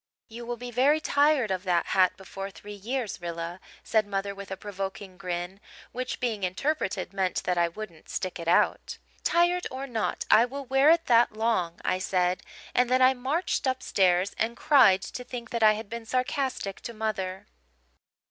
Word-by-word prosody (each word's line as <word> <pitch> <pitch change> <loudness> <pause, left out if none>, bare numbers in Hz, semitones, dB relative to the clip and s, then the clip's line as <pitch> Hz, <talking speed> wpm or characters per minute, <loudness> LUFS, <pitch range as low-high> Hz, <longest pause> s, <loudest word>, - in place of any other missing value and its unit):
"'You 235 +1 -8
will 240 0 -3
be 245 +1 -7
very 275 +6 +3
tired 285 -7 +2
of 185 -1 -1
that 180 -3 +1
hat 185 -1 +4
before 195 0 -7
three 205 +1 -11
years, 220 0 -4
Rilla,' 170 +1 -5 0.2
said 220 -2 +1
mother, 200 0 -2
with 200 -1 -9
a 190 - -5
provoking 195 -1 -6
grin, 180 0 -4 0.3
which, 255 0 -4
being 230 -5 -1
interpreted, 190 - -2
meant 190 -2 -1
that 180 - 0
I 170 -1 +3
wouldn't 170 -2 -9
stick 185 -2 -3
it 170 - -6
out. 170 - +2 0.3
"'Tired 350 +1 +2
or 260 +1 -5
not, 230 -5 -2
I 225 - +8
will 275 +3 -7
wear 270 +3 +4
it 335 0 +4
that 235 -2 +4
long,' 215 -6 0
I 185 - +1
said: 185 -1 0 0.3
and 250 0 +3
then 255 0 +4
I 260 +1 +6
marched 275 +5 -1
upstairs 190 -7 +2
and 230 +2 -1
cried 240 -11 +5
to 250 - -6
think 240 -2 -8
that 235 - -2
I 215 -1 +7
had 215 0 -6
been 230 +1 -7
sarcastic 255 -5 -2
to 235 - -7
mother. 195 -4 -3
215 Hz, 180 wpm, -27 LUFS, 190-255 Hz, 0.3 s, I